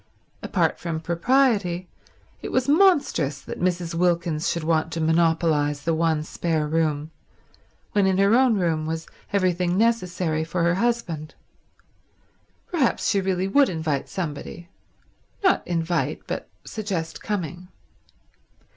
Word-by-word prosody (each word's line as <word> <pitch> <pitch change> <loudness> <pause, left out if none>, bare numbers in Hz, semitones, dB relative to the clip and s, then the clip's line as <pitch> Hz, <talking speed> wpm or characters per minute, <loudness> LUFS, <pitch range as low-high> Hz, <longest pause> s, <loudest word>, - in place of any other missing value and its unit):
Apart - - 0
from 165 -2 -3
propriety, 185 0 +1 0.5
it - - -5
was 255 0 +1
monstrous 285 - +3
that - - -8
Mrs. 175 -2 0
Wilkins 170 -2 +1
should 170 - -2
want 160 0 +1
to 165 - -3
monopolise 160 -3 +2
the 165 - +1
one 160 -1 +1
spare 160 -1 -1
room, 155 -1 0 0.8
when 200 -2 +3
in 190 -1 +2
her 200 +2 +4
own 250 -1 +5
room 165 -5 0
was 160 0 -3 0.3
everything 180 -2 +1
necessary 180 -8 +1
for 170 +2 -2
her 170 0 +3
husband. 180 -8 -2 1.4
Perhaps 305 -9 +1
she 200 -3 +2
really 190 0 0
would 275 +7 +4
invite 160 -5 -2
somebody— 170 0 -5 0.7
not 375 - +4
invite, 170 0 -1
but - - -5 0.2
suggest 185 -7 -4
coming. 180 -3 -4
170 Hz, 125 wpm, -24 LUFS, 160-195 Hz, 1.4 s, own